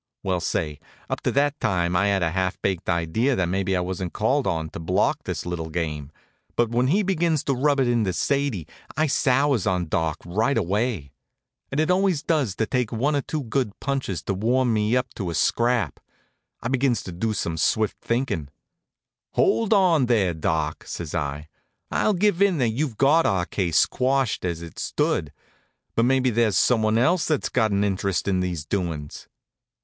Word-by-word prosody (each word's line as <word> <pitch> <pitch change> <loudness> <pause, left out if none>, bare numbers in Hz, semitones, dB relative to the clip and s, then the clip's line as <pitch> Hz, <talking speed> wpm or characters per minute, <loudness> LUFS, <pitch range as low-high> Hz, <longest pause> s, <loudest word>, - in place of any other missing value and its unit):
Well, 95 -2 0
say, 75 -3 -2 0.3
up - - -2
to - - 0
that 145 +1 +1
time 90 -3 0
I 100 +3 +3
had 100 -2 +1
a 80 - +1
half 95 +1 -1
baked 95 -2 -1
idea 90 +10 +1
that 95 - +1
maybe 95 +1 0
I - - 0
wasn't 90 0 -4
called 130 +5 +1
on 80 -4 -2
to - - -7
block 80 - 0
his - - -3
little 85 -2 -4
game, 75 -3 -3 0.4
but 120 -1 +1
when 120 +2 +2
he 195 +9 +2
begins 170 -5 +1
to 140 - 0
rub 140 +2 +2
it 130 - +3
into 115 -5 +1
Sadie 135 - -1 0.3
I 155 - +3
sours 135 - +2
on 90 -4 0
Doc 80 -2 0
right 110 +10 0
away. 100 - -1 0.6
And 140 - -1
it 155 +3 +2
always 185 -4 +2
does 145 - 0
take 120 +2 -1
one 135 +6 0
or 140 - +1
two 150 +1 -4
good 115 -3 -2
punches 130 - -2
to 100 - -2
warm 120 +5 +1
me 110 +3 +2
up 125 -1 -2
to 95 -5 -4
a 85 - -3
scrap. 115 - +1 0.6
I - - -1
begins 130 -1 +1
to 90 - -7
do 110 +6 -2
some 85 -5 -2
swift 110 +7 +1
thinkin'. 115 - -1 0.8
"Hold 225 -2 +2
on 175 - +4
there, 100 -7 +2
Doc," 80 -1 -2
says 85 -4 -6
I. 75 +1 -3 0.4
"I'll 215 - +2
give 200 0 +2
in 200 -4 +4
that 125 -5 +2
you've 120 0 -2
got 150 +5 +4
our 95 -2 +1
case 90 -4 +2
quashed 130 -5 0
as 85 -2 -3
it 85 - -10
stood. 75 - -1 0.6
But 115 - +2
maybe 130 0 +2
there's 110 -4 +2
someone 110 -2 +3
else 165 +8 +3
that's 155 -3 0
got 110 -3 +2
an 100 0 +1
interest 100 -1 -1
in 95 -2 +1
these 90 -4 -2
doin's." 80 -5 -4
110 Hz, 185 wpm, -24 LUFS, 90-135 Hz, 0.8 s, on